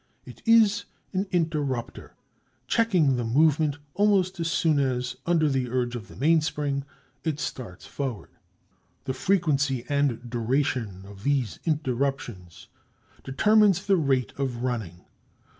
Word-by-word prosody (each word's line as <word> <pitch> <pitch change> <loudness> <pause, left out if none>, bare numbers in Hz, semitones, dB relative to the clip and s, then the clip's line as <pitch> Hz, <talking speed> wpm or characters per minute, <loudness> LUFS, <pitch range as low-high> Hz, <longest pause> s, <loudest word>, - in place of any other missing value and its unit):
It - - -12
is 225 -3 +5 0.3
an 195 +2 -1
interrupter, 150 -8 -2 0.5
checking 180 - +2
the 120 - -1
movement 145 +4 +2 0.2
almost 195 -3 +2
as 165 0 -1
soon 155 0 +2
as, 125 -2 -1
under 165 -3 +3
the 130 -3 0
urge 125 -1 -1
of 115 -2 -7
the - - -14
mainspring, 150 -2 +1 0.4
it 155 -3 -2
starts 90 - -6
forward. 120 - -5 0.7
The 130 - -2
frequency 145 -7 +1
and 140 -5 0
duration 120 -4 -1
of 100 0 -12
these 135 -6 0
interruptions 130 - -2 0.6
determines 200 +6 +3
the 200 - +4
rate 135 - +1
of 125 -3 -2
running. 110 -9 -4
140 Hz, 125 wpm, -26 LUFS, 125-160 Hz, 0.7 s, is